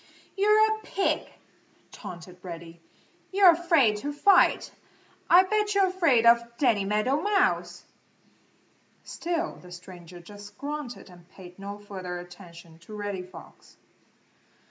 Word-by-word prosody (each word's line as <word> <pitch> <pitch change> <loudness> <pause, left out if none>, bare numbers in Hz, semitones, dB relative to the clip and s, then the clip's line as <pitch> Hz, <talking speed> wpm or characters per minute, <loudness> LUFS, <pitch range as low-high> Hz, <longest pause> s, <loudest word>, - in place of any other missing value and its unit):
"You're 425 +2 +4
a - - -11
pig!" 395 -2 -2 0.6
taunted 180 +1 -10
Reddy. 170 -2 -10 0.5
"You're 385 -2 +7
afraid 325 - +2
to 285 +7 -4
fight. 365 +6 +3 0.6
I 360 +2 +7
bet 420 +1 -1
you're 395 -1 +4
afraid 330 -11 +2
of 235 0 +6 0.2
Danny 230 -8 +2
Meadow 215 +8 0
Mouse!" 400 -1 0 1.2
Still 340 0 -4
the 180 - -15
stranger 175 -1 -12
just 205 +3 -13
grunted 290 -3 -6
and 175 -1 -18
paid 180 -1 -14
no 200 +1 -7
further 190 -3 -7
attention 170 -2 -13
to 190 +6 -12
Reddy 205 -2 -4
Fox. 185 +1 -15
210 Hz, 120 wpm, -26 LUFS, -, 1.2 s, You're